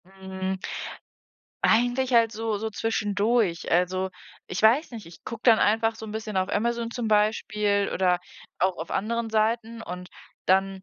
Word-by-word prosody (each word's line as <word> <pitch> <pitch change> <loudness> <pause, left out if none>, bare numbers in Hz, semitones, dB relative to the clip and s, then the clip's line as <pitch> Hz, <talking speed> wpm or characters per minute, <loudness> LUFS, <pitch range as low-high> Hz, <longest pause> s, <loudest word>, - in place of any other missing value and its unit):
Mhm. 190 0 -5 1.0
Eigentlich 245 +3 +2
halt 230 -2 +4
so 220 -1 -2
so 220 +1 -3
zwischendurch. 210 -3 0
Also, 185 +2 +1 0.4
ich 180 - -4
weiß 240 +9 +4
nicht, 225 -5 -8
ich 165 - -15
gucke 230 0 -7
dann 230 -3 +7
einfach 225 +2 +2
so 220 0 -9
'n 210 - -7
bisschen 220 -2 -4
auf 185 0 +1
Amazon 235 +2 -1
zum 240 -1 -3
Beispiel 210 -1 +1
oder 180 -1 +2 0.4
auch 185 0 +1
auf 165 - -6
anderen 230 +2 -1
Seiten, 225 +1 0
und 180 -1 -7 0.4
dann 190 0 +2
215 Hz, 155 wpm, -26 LUFS, 190-225 Hz, 1.0 s, dann